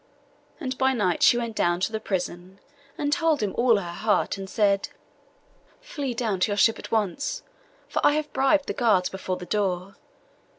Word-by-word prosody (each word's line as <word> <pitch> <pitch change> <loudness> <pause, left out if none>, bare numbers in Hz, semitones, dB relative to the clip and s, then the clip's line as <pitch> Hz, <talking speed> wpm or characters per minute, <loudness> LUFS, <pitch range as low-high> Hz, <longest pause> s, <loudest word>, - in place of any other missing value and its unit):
And 260 -5 -3
by 265 0 +3
night 195 -8 0
she 240 - +6
went 235 -2 -3
down 175 -2 +1
to 205 - 0
the 220 - -2
prison, 185 -1 -4 0.4
and 290 0 0
told 320 -5 +1
him 200 - -1
all 235 -1 +4
her 175 -4 -4
heart; 210 +5 0
and 195 -1 -7
said— 200 -2 +1 0.9
'Flee 285 - -5
down 220 -6 -1
to 190 - +3
your 205 - -1
ship 225 +2 +3
at - - -9
once, 220 - -1 0.4
for - - -2
I 290 - +5
have 305 0 -2
bribed 275 +2 +3
the - - -3
guards 215 -7 +2
before 190 -1 -4
the 180 - -8
door. 195 -1 -2
215 Hz, 185 wpm, -25 LUFS, 190-260 Hz, 0.9 s, she